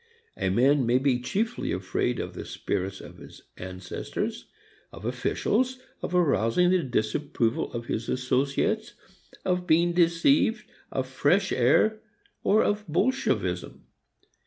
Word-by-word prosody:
A - - -1
man 130 +6 +3
may 120 +1 +4
be 130 -2 +2
chiefly 220 - -2
afraid 95 +6 -1
of - - -4
the - - -6
spirits 95 +1 -3
of - - -12
his - - -13
ancestors, 90 0 -5 0.4
of 105 - -10
officials, 220 - 0 0.2
of 180 - -3
arousing 160 - +3
the 185 -1 +3
disapproval 120 -1 -1
of 120 -1 -5
his 115 -1 -3
associates, 130 +2 0 0.5
of 180 -1 0
being 170 +1 +3
deceived, 180 - +3 0.3
of 130 - -1
fresh 145 +9 +2
air, 155 - +3 0.4
or 215 - +4
of 210 0 0
Bolshevism. 250 - -1
140 Hz, 125 wpm, -27 LUFS, 120-180 Hz, 0.5 s, may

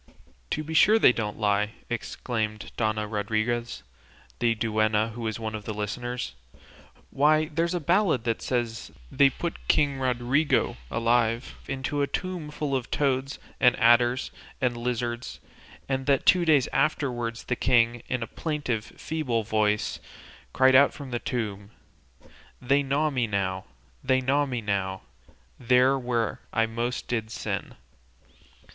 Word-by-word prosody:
"To 155 - -2
be 160 +1 -6
sure 210 +7 +6
they 125 - +6
don't 105 -3 -3
lie!" 105 0 +1
exclaimed 110 -2 -3
Dona 110 -1 0
Rodriguez, 110 +3 -2 0.6
the 115 -1 +2
duenna, 110 -1 +1
who 115 +2 -8
was 110 -1 -3
one 110 -1 -4
of 105 -1 -6
the 110 - -4
listeners. 120 - -4 0.8
"Why, 155 +2 +3
there's 170 +3 0
a - - 0
ballad 170 - +2
that 115 -2 -1
says 120 -3 -2 0.2
they 140 0 +5
put 170 +5 -6
King 140 -2 +2
Rodrigo 130 - +1
alive 115 +1 +1
into 135 +1 -2
a 140 - +1
tomb 180 -3 -4
full 150 -2 -2
of 125 -2 -3
toads, 135 -1 0 0.2
and 125 -1 +5
adders, 120 +2 +4 0.3
and 125 -3 0
lizards, 120 0 -3 0.5
and 135 0 -2
that 140 -2 +2
two 180 -2 +5
days 150 -6 +4
afterwards 120 -6 0
the 125 - -1
king, 120 -1 +2
in 125 -2 -1
a - - -3
plaintive, 140 -5 -3
feeble 130 -8 -3
voice, 105 0 0 0.5
cried 130 0 +4
out 140 +2 +6
from 140 -2 -8
within - - -11
the 120 - -1
tomb 105 -4 -4 0.9
They 140 +3 +2
gnaw 145 +3 0
me 125 -4 0
now, 95 -2 -2 0.4
they 130 0 +3
gnaw 140 +3 +1
me 125 -3 -3
now, 95 -2 -2 0.6
There 125 +2 +4
where 120 -3 -1
I 115 - +2
most 115 +2 -3
did 110 -3 -2
sin. - - -4
120 Hz, 145 wpm, -26 LUFS, 110-135 Hz, 0.9 s, sure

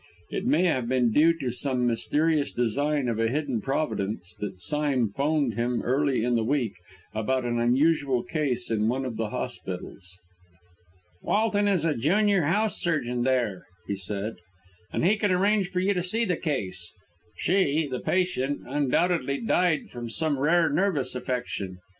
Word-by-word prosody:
It 205 - -2
may 265 -8 +3
have 130 -9 0
been 125 -3 +2
due 165 +7 +4
to 130 -6 -2
some 125 0 +1
mysterious 145 +6 +1
design 140 +4 0
of 115 -2 -1
a 115 - +2
hidden 135 -4 -1
providence 110 - -2
that 100 -3 -5
Sime 135 +5 +1
'phoned 140 +2 0
him 120 +1 -1
early 135 -1 +1
in 120 0 +1
the 115 -1 +2
week 120 -3 0 0.4
about 125 +4 -1
an 120 0 0
unusual 135 +1 +2
case 130 -7 0
in 110 0 +1
one 130 +2 -1
of 125 -3 -4
the 110 -2 -2
hospitals. 90 -2 -6 1.0
"Walton 205 -1 +1
is 185 -6 +1
junior 200 - +3
house 200 +8 +1
surgeon 125 -9 0
there," 120 -7 0 0.2
he 100 - -1
said, 100 +3 -4 0.5
"and - - 0
he 210 +4 +4
can 205 0 +1
arrange 195 +1 +2
for 185 -2 -1
you 200 +2 +2
to 180 - -1
see 220 +6 +1
the 180 -4 0
case. 95 - -3 0.5
She 160 -5 +1
(the 130 -2 -4
patient) 160 -7 0
undoubtedly 145 +1 +1
died 180 -8 +1
from 120 -1 -6
some 150 +2 0
rare 165 +4 +3
nervous 160 -11 0
affection. 125 -7 -4
135 Hz, 160 wpm, -26 LUFS, 120-165 Hz, 1.0 s, due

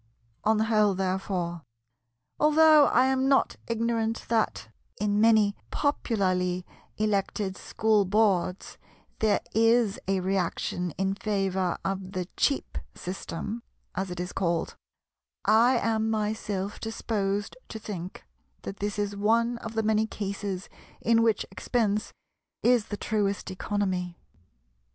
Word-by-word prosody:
On 220 +1 +3
the 215 - +2
whole 215 -3 +3
therefore—although 175 - +1
I 255 - +4
am 265 0 +2
not 275 - +3
ignorant 230 -1 -1
that, 220 - 0 0.3
in 205 0 +1
many 215 -2 +5
popularly 185 -10 0 0.3
elected 200 -2 0
School 215 +2 +1
Boards, 195 -2 +1 0.4
there 215 -2 +2
is 225 -1 +3
a 195 0 +2
reaction 180 -1 -1
in 195 0 +1
favour 195 -3 -1
of 195 0 -3
"the 180 -2 -3
cheap 280 - 0 0.2
system" 195 +4 -5 0.3
as 190 +1 -2
it 180 0 -6
is 180 +1 -4
called—I 215 +6 0
am 220 -1 0
myself 210 -2 -2
disposed 205 -3 -2
to - - -6
think 190 -4 -7 0.4
that 195 - -6
this 205 +1 -3
is 205 -1 -1
one 230 +3 +2
of 225 0 -7
the 220 - +1
many 220 0 +2
cases 200 -2 -4 0.3
in 230 0 +3
which 225 -2 +2
expense 215 -4 0 0.5
is 240 -3 +4
the 205 - -4
truest 200 -3 -1
economy. 185 -3 -2
205 Hz, 120 wpm, -27 LUFS, 190-225 Hz, 0.5 s, many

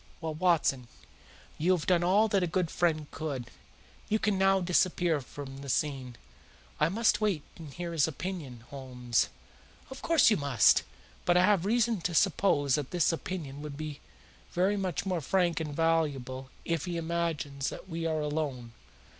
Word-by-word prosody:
Well, 160 -2 -3
Watson, 155 -7 +1 0.7
you 175 +4 +3
have 170 -5 -1
done 175 -2 +3
all 200 +5 +4
that 195 -1 +2
a 180 - +1
good 175 0 -1
friend 160 -3 +1
could. 135 -6 -5 0.6
You 215 - +3
can 210 -2 +1
now 195 0 +4
disappear 175 -3 +2
from 135 +1 -9
the 140 0 -8
scene." 130 -3 -1 0.6
"I 150 - +3
must 220 +4 +2
wait 195 -9 +1
and 160 -4 -10
hear 175 +3 -5
his 160 -3 +3
opinion, 160 -6 -5
Holmes." 125 -4 -1 0.6
"Of 265 - -8
course 330 -8 +5
you 210 - +3
must. 140 -7 +4 0.4
But 175 0 +3
I 180 - +6
have 200 -3 +3
reasons 230 -2 +2
to 175 - -1
suppose 155 -6 +3
that 145 -2 0
this 175 -3 +2
opinion 160 -5 -5
would 150 -2 -7
be 150 -2 -6 0.5
very 190 +4 +2
much 190 -3 -2
more 180 -3 -1
frank 175 +3 +1
and 150 -3 -4
valuable 140 -6 0 0.2
if 165 -3 -1
he 175 -2 -3
imagines 160 -5 -2
that - - -9
we 165 -2 -3
are 155 -1 0
alone. 145 -6 -3
165 Hz, 170 wpm, -30 LUFS, 145-185 Hz, 0.7 s, I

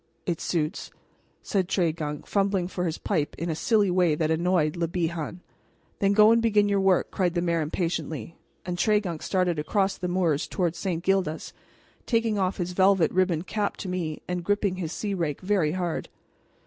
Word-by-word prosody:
"It 170 -3 -2
suits," 160 -2 -2 0.5
said 190 -3 0
Tregunc, 160 -5 -1
fumbling 195 -3 +1
for 180 -1 -3
his 165 -1 -2
pipe 155 -7 -1
in 170 +1 -2
a - - -2
silly 205 +1 +2
way 175 -4 +3
that 155 0 0
annoyed 160 -1 +1
Le 170 -1 -1
Bihan. 170 0 -3 0.6
"Then 200 0 +3
go 215 +1 +7
and 230 0 +4
begin 210 -3 +3
your 200 -1 +2
work," 190 -2 +2
cried 180 -2 0
the 175 - +1
mayor 170 -1 +1
impatiently; 165 - -3 0.3
and 175 -1 -3
Tregunc 205 -7 +1
started 180 -4 0
across 195 +5 0
the 180 - -2
moors 175 -5 +1
toward 175 -3 -1
St. 175 -3 -3
Gildas, 185 -5 0 0.5
taking 230 -3 +1
off 185 0 0
his 180 -1 -2
velvet 190 -1 +4
ribboned 180 -2 +1
cap 210 0 -2
to - - -6
me 175 -4 -3
and 180 -1 -3
gripping 200 0 0
his 165 -4 -3
sea 205 +2 -3
rake 165 -6 -2
very 185 -5 +1
hard. 175 -3 -3
180 Hz, 180 wpm, -26 LUFS, 165-195 Hz, 0.6 s, go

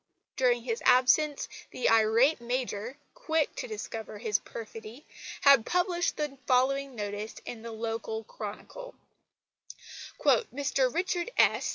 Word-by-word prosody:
During 245 -2 +2
his 230 -2 -3
absence 275 +4 +4 0.2
the - - -1
irate 225 +6 +4
Major, 245 0 -3 0.2
quick 320 - -1
to - - -4
discover 225 - -6
his 215 -1 0
perfidy, 225 +4 -9 0.4
had 280 -5 +7
published 355 - 0
the 295 -3 -3
following 270 +1 +2
notice 205 0 -5
in 230 - -7
the 230 0 -7
local 225 0 -4
Chronicle: 225 - -8 1.2
"Mr 275 - +2
Richard 355 - -1
S. - - +3
250 Hz, 120 wpm, -29 LUFS, 225-295 Hz, 1.2 s, had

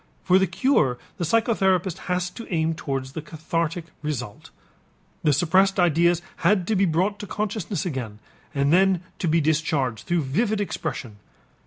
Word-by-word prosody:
For 185 +1 +5
the 190 - +2
cure 185 - +2 0.2
the - - -2
psychotherapist 190 -3 +2
has 180 0 0
to 230 +3 -10
aim 165 -1 +1
toward 135 -4 -3
the 135 +4 -7
cathartic 165 +2 -3 0.2
result. 125 -8 -5 0.7
The 150 - +4
suppressed 190 +6 +3
ideas 170 0 +3
had 195 -4 +2
to 220 - +2
be 195 0 +3
brought 185 +5 0
to 205 - -6
consciousness 205 -4 -3
again 125 -10 -4 0.3
and 140 +1 +1
then 185 -1 +4 0.2
to 175 - -1
be 165 +1 +3
discharged 145 -6 0
through 175 -2 +1
vivid 205 - 0
expression. 120 - -4
170 Hz, 155 wpm, -24 LUFS, 150-190 Hz, 0.7 s, For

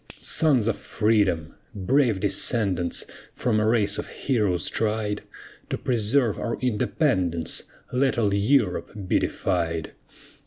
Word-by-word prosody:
Sons 135 -9 +3
of 115 - 0
Freedom! 100 -8 +1 0.2
brave 115 0 +2
descendants 100 -4 0 0.3
From 110 -3 +1
a 105 - +2
race 105 -3 +2
of - - -5
heroes 105 -10 0
tried, 105 -2 -1 0.5
To - - -1
preserve 120 -1 +1
our 115 - -2
independence 105 - 0 0.3
Let 130 0 +2
all 105 -4 +2
Europe 105 -1 +1
be - - +3
defied. 85 -3 -1
105 Hz, 115 wpm, -25 LUFS, 95-120 Hz, 0.5 s, Sons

